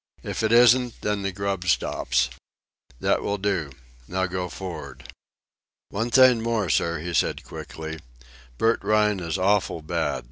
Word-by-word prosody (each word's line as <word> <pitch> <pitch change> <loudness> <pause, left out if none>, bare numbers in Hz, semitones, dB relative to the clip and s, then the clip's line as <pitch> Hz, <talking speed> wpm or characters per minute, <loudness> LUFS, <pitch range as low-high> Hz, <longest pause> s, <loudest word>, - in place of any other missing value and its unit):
If - - -3
it 110 0 +1
isn't, 120 +1 +5
then 105 -1 -1
the 100 0 -2
grub 100 -1 -3
stops. - - +1 0.7
That - - +1
will 100 - -1
do. 95 -7 -1 0.4
Now 95 +1 -1
go 90 0 -3
for'ard." 95 -2 -7 0.9
"One 115 +4 -2
thing 125 -1 +6
more, 110 -7 0
sir," 85 +6 +1
he 85 +3 -5
said - - 0
quickly. 80 0 -7 0.6
"Bert 115 - +2
Rhine 105 -1 +2
is 85 0 -3
awful 95 -3 +1
bad. - - -1
100 Hz, 145 wpm, -25 LUFS, 85-110 Hz, 0.9 s, thing